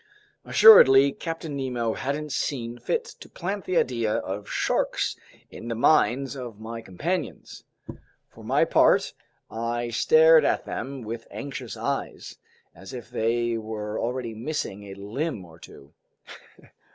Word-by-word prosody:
Assuredly, 140 - +8
Captain 165 -1 -6
Nemo 125 -4 -2
hadn't 145 +2 -4
seen 120 -3 -3
fit 475 0 -1
to - - -13
plant 195 +3 -5
the 185 - 0
idea 115 -6 +1
of 100 +2 -4
sharks - - -1 0.4
in 115 - -9
the 115 - -3
minds 135 +1 +2
of 120 -5 -8
my 115 +1 -7
companions. 150 - -5 0.6
For - - -16
my - - +2
part, - - +3 0.4
I 120 +1 -3
stared 480 - +6
at - - 0
them 135 -2 -5
with 115 +1 -7
anxious 140 -1 -7
eyes, - - -4 0.3
as 95 0 -12
if 120 -1 -9
they 120 0 0
were 110 -1 -5
already 120 -1 -3
missing 110 -4 -4
a 95 -1 -9
limb 105 - -4
or 80 0 -16
two. 70 -2 -15
120 Hz, 135 wpm, -25 LUFS, 110-140 Hz, 0.6 s, Assuredly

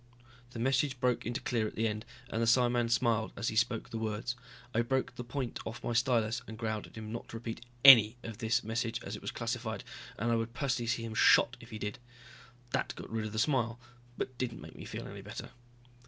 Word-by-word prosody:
The 120 - -9
message 135 +2 +1
broke 125 -3 +1
into 120 +3 -2
clear 115 -3 0
at - - -8
the 115 +1 +1
end 110 +1 -3 0.3
and 115 - 0
the 115 - +2
psiman 120 0 +4
smiled 115 -2 +2
as 115 - 0
he - - -4
spoke 115 0 +1
the 115 - -3
words. 110 +3 -2 0.4
I 115 - +3
broke 130 +1 0
the 120 - -6
point 125 +1 -3
off 115 +1 -6
my 120 - -1
stylus 120 -1 +2
and 110 - -7
growled 110 -2 -2
at - - -17
him 110 -1 -6
not 115 - -5
to 115 - -7
repeat 115 0 -6 0.2
any 120 -4 +10
of 115 -2 -7
this 110 +1 +1
message, 115 +1 -1
as - - -5
it - - -9
was - - -4
classified, 115 -1 -3 0.3
and 115 +3 0
I 115 - +3
would 115 +1 -3
personally 125 -3 0
see 115 0 0
him 115 -1 -4
shot 115 +2 +6
if 120 - -13
he 110 - -6
did. 105 0 -4 0.7
That - - -1
got - - -9
rid 110 -1 -1
of - - -7
the 110 - -5
smile, 115 -1 +1 0.4
but 130 -2 -4
didn't 120 -2 -2
make - - -11
me - - -9
feel - - -6
any - - -8
better. - - -7
115 Hz, 230 wpm, -32 LUFS, 110-120 Hz, 0.7 s, any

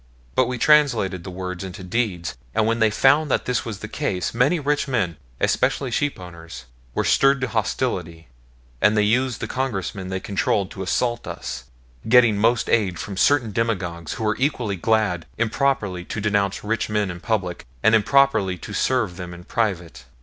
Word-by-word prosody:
But 130 - +3
we 125 0 -3
translated 120 - +3
the 95 - -7
words 90 0 -5
into 95 +1 -7
deeds; 90 - -2 0.2
and 110 - +3
when 115 +1 +1
they 110 -1 +4
found 145 +7 +3
that - - 0
this 125 -2 0
was 110 -4 -6
the - - -5
case, 90 -1 -2
many 140 +9 +2
rich 145 0 0
men, 105 -11 0 0.2
especially 135 -3 +1
sheep 145 +1 -1
owners, 85 -6 -10 0.3
were - - +1
stirred 135 0 +4
to 135 - 0
hostility, 95 - -2 0.5
and 105 +1 +4
they 105 - +4
used 125 +3 +1
the - - -2
Congressmen 100 -7 -3
they 95 0 -2
controlled 100 0 -1
to 95 - -7
assault 120 +5 -1
us - - -6 0.4
getting 120 -3 +6
most 115 +2 +2
aid 100 -6 +1
from 100 - -6
certain 120 +3 +3
demagogues, 90 -7 -2
who - - -5
were 110 0 +1
equally 125 -7 0
glad 95 -4 0
improperly 110 -6 0
to 110 - -5
denounce 100 -2 0
rich 110 +1 -1
men 105 -3 0
in 90 - -8
public 95 -4 -2 0.2
and 110 - +5
improperly 110 -4 +3
to - - -9
serve 115 -9 0
them 90 -2 -7
in 85 - -12
private. 85 - -2
105 Hz, 180 wpm, -22 LUFS, 90-125 Hz, 0.5 s, getting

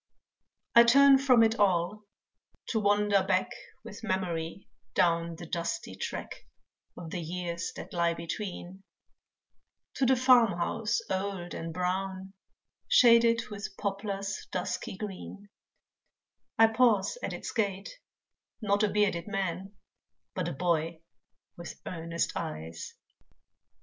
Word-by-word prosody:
I 235 - +9
turn 275 +3 +7
from 255 -4 +5
it 225 +1 +1
all 200 +1 +1 0.6
to 225 - +1
wander 205 -1 +3
back 185 -1 +1 0.3
With 205 +2 -10
Memory 185 -3 -3 0.3
down 170 -1 +2
the 175 +1 -9
dusty 170 - -3
track 95 - -5 0.6
Of 165 -2 -8
the 180 - -3
years 170 +3 -4
that - - -9
lie 170 -1 +1
between, 180 +2 -6 1.2
To 265 - +2
the 265 - +5
farm 245 -6 +5
house 220 +6 -1
old 190 -2 -3
and 165 0 -5
brown, 190 +2 -3 0.5
Shaded 230 -1 +5
with 200 -1 -7
poplars 200 -1 -4
dusky 185 +1 -3
green, 205 0 -8 1.1
I 225 - +8
pause 225 - +2
at - - -3
its - - -6
gate, 200 - -3 0.6
not 205 -2 +1
a 215 - +3
bearded 200 -4 0
man, 195 -1 -3 0.6
But - - -2
a - - -3
boy 165 +1 -1 0.6
with 170 - -9
earnest 170 -1 -2
eyes. 80 +1 -6
195 Hz, 120 wpm, -29 LUFS, 170-215 Hz, 1.2 s, I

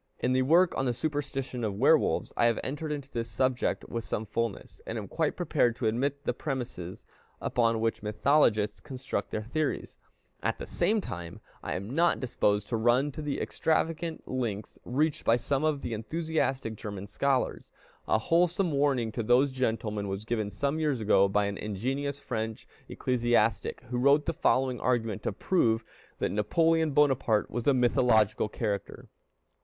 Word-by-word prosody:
In 125 +1 0
a 130 - +3
work 170 +7 +4
on 135 - 0
the 120 -2 0
superstition 135 -3 -3
of 105 -3 -1
Werewolves, 140 +9 +3
I 120 - +4
have 115 - +1
entered 150 +3 -4
into 140 -2 -5
this 115 -1 -3
subject 130 +3 0
with 115 -1 -4
some 110 - -3
fulness, 115 0 -4
and - - -3
am - - -5
quite - - -1
prepared 120 -1 +2
to 120 - -4
admit 140 +6 0
the - - +1
premises 120 - -5 0.3
upon 115 -2 +1
which 115 0 -1
mythologists 105 -1 +2
construct 135 0 -4
their 110 - -3
theories; 145 +6 -3 0.4
at - - -1
the - - -6
same 215 0 +1
time 85 - -7 0.2
I 80 - -3
am 100 +7 -5
not 170 +3 +3
disposed 105 -5 0
to 115 - 0
run 120 +6 +3
to 155 - -7
the 150 -2 -2
extravagant 160 +1 -1
lengths 110 -6 -3
reached 150 +5 0
by 115 - +4
some 135 +4 -1
of 155 -3 0
the - - -3
most - - -1
enthusiastic 155 -8 -1
German 100 -2 -6
scholars. 130 +5 -1 0.4
A - - +3
wholesome 175 - +2
warning 140 -5 +1
to 115 - -3
these 125 +5 +3
gentlemen 110 -5 -1
was 95 +2 -4
given 110 -3 -1
some 140 - -1
years 150 -5 0
ago 100 -2 +4
by 105 +1 +2
an 100 0 -3
ingenious 130 +8 -2
French 110 -5 -4 0.2
ecclesiastic, 120 -3 +1
who 125 0 -3
wrote 140 +3 +4
the 165 - -1
following 130 -6 +1
argument 115 -5 0
to - - -1
prove 115 - +1 0.3
that - - -1
Napoleon 160 +10 +2
Bonaparte 135 -7 +2
was 120 -1 -3
a 140 - +6
mythological 115 -4 +3
character. 105 -2 -4
125 Hz, 170 wpm, -29 LUFS, 110-140 Hz, 0.4 s, a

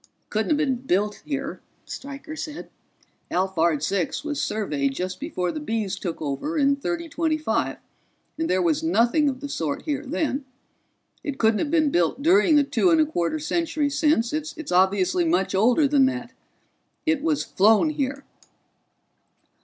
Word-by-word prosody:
"It - - -47
couldn't 220 0 0
have 305 - +3
been 275 -4 +1
built 210 -4 -1
here," 280 -2 -4 0.2
Stryker 280 +3 -8
said. 305 -1 -7 0.6
"Alphard 170 -5 +1
Six 180 - -1
was 295 -2 -2
surveyed 145 -10 -1
just 185 +2 -4
before 185 - -2
the - - -5
Bees 220 -9 -2
took 180 -4 -5
over 160 - -3
in 280 -1 +3
3025, 330 0 -1 0.6
and 325 - -1
there 185 0 +2
was 165 -3 +1
nothing 235 - +3
of 260 0 -5
the 285 - -4
sort 160 - -3
here 290 -2 -2
then. 285 0 -2 0.8
It 285 -2 -4
couldn't 220 -3 +3
have 300 - -1
been 310 -2 +2
built 175 - +1
during 345 -1 +5
the 295 - +6
two 285 +6 +2
and 325 -2 +4
a 310 - +5
quarter 295 - -1
centuries 300 -2 -1
since; 295 -7 +2
it's 310 -2 -4
obviously 185 0 +3
much 175 +3 +1
older 240 +9 +4
than 275 -2 +4
that. 255 -2 -4 0.7
It 315 -3 +1
was 305 -2 +1
flown 220 - +3
here." 280 -1 -3
275 Hz, 160 wpm, -24 LUFS, 190-305 Hz, 0.8 s, the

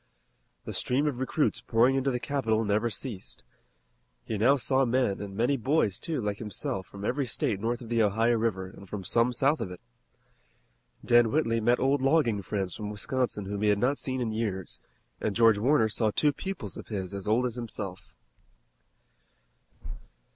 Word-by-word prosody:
The - - -5
stream 135 +4 0
of 140 -5 -1
recruits 140 +3 0
pouring 120 +3 +3
into 135 0 +1
the 125 -2 -1
capital 115 -6 0
never 105 +3 +1
ceased. 105 -2 -6 0.8
He 110 - -3
now 120 +7 +4
saw 135 +1 +2
men, 125 -5 +1
and 100 -1 -7
many 125 +5 +2
boys, 120 - +1
too, 160 +1 -3
like 105 -2 -2
himself, 95 -3 -4
from 100 0 -8
every 135 +3 0
state 105 -4 0
north 115 +3 -2
of 115 - -9
the 115 -1 +2
Ohio 115 +3 +3
River 105 -5 -1
and 95 0 -13
from 100 -1 -5
some 115 +6 +3
south 135 +3 +1
of 105 - -3
it. 90 - -9 1.3
Dan 120 -2 +5
Whitley 115 -7 +1
met 120 +3 +3
old 135 +1 +2
logging 135 -7 +2
friends 95 -2 -3
from 105 -2 -5
Wisconsin 105 0 -1
whom 100 +1 -4
he 105 - +3
had 105 - +3
not 130 +7 +1
seen 130 -1 -2
in 115 -2 -1
years, 105 -5 -2 0.4
and 105 - -2
George 115 -3 +5
Warner 130 0 +3
saw 110 0 +1
two 145 +7 +2
pupils 170 - -5
of - - -9
his 95 -3 -4
as 100 0 -5
old 115 +4 +3
as 125 - -2
himself. 105 -6 -7
115 Hz, 180 wpm, -28 LUFS, 105-130 Hz, 1.3 s, Dan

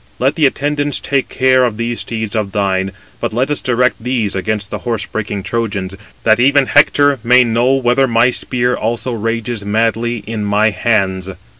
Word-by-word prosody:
Let 135 +3 +1
the 155 -3 +3
attendants 145 +1 -1
take 135 -1 -1
care 130 0 +3
of 120 -4 -1
those 115 +1 -3
steeds 110 -2 -4
[of 105 -3 -2
thine], 95 -2 0 0.3
but - - -3
let 130 +5 0
us 145 - -1
direct 125 -1 +1
these 120 -5 -1
against 105 +1 -2
the - - -4
horse 115 -4 -3
breaking 105 -2 -4
Trojans, 105 -5 -3 0.3
that 110 0 +4
even 140 +2 +4
Hector 145 -1 +3
may 125 +1 +5
know 120 +2 +1
whether 130 +1 +2
my 120 +1 +3
spear 125 0 -1
also 120 +3 -2
rages 115 0 -3
madly 115 +2 -1
in 110 -1 -4
my 105 +2 +2
hands." 95 -2 0
115 Hz, 175 wpm, -16 LUFS, 105-125 Hz, 0.3 s, may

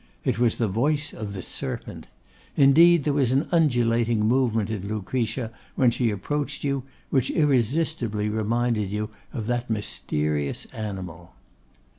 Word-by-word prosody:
It - - 0
was 120 -2 +2
the 115 - +1
voice 145 +9 0
of 105 -2 -6
the 95 - -5
serpent; - - -5 0.5
indeed, 155 +4 +6
there 145 - +1
was 135 -3 +2
an 135 +4 +1
undulating 120 -8 +2
movement 115 -2 +1
in 100 -3 -4
Lucretia, 115 +3 -2 0.2
when 125 -3 +4
she 120 0 +1
approached 145 +8 -3
you, 140 -1 0 0.3
which 130 -4 +2
irresistibly 130 -5 +1
reminded 110 0 0
you 105 +2 -3 0.2
of 115 -5 -4
that 120 +1 -2
mysterious 75 -9 -1
animal. 90 - -7
115 Hz, 135 wpm, -25 LUFS, 105-135 Hz, 0.5 s, indeed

